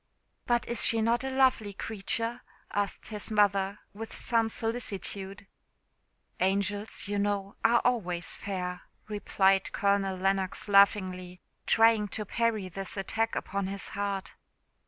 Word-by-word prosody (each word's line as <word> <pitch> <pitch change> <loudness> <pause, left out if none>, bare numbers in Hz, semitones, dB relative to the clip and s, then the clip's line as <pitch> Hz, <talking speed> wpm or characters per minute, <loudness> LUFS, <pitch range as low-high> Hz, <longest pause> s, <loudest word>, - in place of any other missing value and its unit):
"But 240 -1 +1
is 235 - +1
she 230 - +4
not 230 +3 +2
a 265 - -2
lovely 260 -6 +2
creature?" 230 +3 -2 0.3
asked 205 -1 -2
his 210 -2 -3
mother, 200 -1 +2
with 225 +2 -7
some 230 -2 +1
solicitude. 205 -4 -3 0.9
"Angels, 200 +3 -1
you 205 0 -1
know, 200 -1 -1
are 235 +1 +5
always 180 -9 0
fair," 180 -2 -4 0.3
replied 195 -2 +2
Colonel 200 -1 +1
Lennox 195 +1 -1
laughingly, 185 -3 +3 0.3
trying 225 -2 +4
to 215 - -4
parry 225 -2 0
this 195 +4 -6
attack 225 +3 -1
upon 195 0 -2
his 195 0 -3
heart. 200 -1 -3
200 Hz, 125 wpm, -29 LUFS, 195-225 Hz, 0.9 s, are